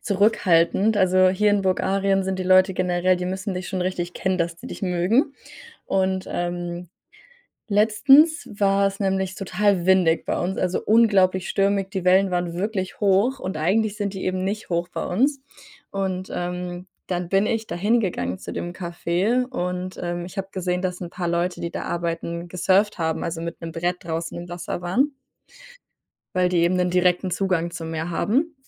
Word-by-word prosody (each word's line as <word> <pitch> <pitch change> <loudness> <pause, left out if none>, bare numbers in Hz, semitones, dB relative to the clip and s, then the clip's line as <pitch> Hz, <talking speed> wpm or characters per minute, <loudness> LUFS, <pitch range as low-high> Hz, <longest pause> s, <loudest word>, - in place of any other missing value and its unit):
zurückhaltend. 200 0 +2
Also 185 -1 +4
hier 205 +3 +2
in 205 -1 +2
Bulgarien 195 +1 +1
sind 190 0 -2
die - - -1
Leute 185 0 +4
generell 180 0 +1
die 180 0 -3
müssen 190 +1 -3
dich 180 0 -5
schon 185 - -3
richtig 180 -1 -3
kennen, 190 -1 -1
dass 170 0 -1
die - - -11
dich - - -8
mögen. 195 - +1 0.5
Und, 190 -1 0
ähm, 175 0 -4 0.8
letztens 225 +10 +5
war’s 195 -1 +2
nämlich 190 -1 -1
total 195 -2 0
windig 185 -3 +3
bei - - -1
uns, 185 +2 -2
also 180 0 0
unglaublich 195 -5 +3
stürmig, 195 -1 +1
die 190 -3 -4
Wellen 190 +1 +4
waren 175 -1 -1
wirklich 190 0 -3
hoch 205 +6 +3
und 185 -3 -4
eigentlich 205 +6 +1
sind 205 -1 -3
die 190 - -5
eben 185 0 -1
nicht 205 +3 -3
hoch 170 +1 0
bei - - -4
uns, 270 +9 +1 0.5
und, 190 -1 -3
ähm, 180 0 -4 0.2
dann 175 -1 -3
bin 195 +1 +3
ich 225 -1 -1
da - - -5
hingegangen 175 - 0
zu - - -8
dem 175 - -4
Café 180 +7 -1
und, 180 -6 -4
ähm, 175 0 -3
ich 185 - -12
habe 195 0 -3
gesehen, 180 -1 -2
dass 180 -1 -3
’n 175 -2 -6
paar 175 -1 -3
Leute, 170 +1 -1
die 170 - -3
da - - -5
arbeiten, 170 0 -3
gesurft 190 +3 +2
haben, 160 -1 -1
also 165 0 -3
mit 170 0 -6
’nem 165 -1 -6
Brett 175 +2 -1
draußen 165 0 -4
im 175 +1 -7
Wasser 175 0 -5
waren 260 +12 +1 1.2
weil 180 -1 +3
die 180 - +1
eben 170 +2 +3
’nen 180 -1 +1
direkten 180 +1 +2
Zugang 180 -2 0
zum 165 -1 -6
Meer 165 +2 -3
haben 280 - 0
185 Hz, 180 wpm, -23 LUFS, 175-195 Hz, 1.2 s, letztens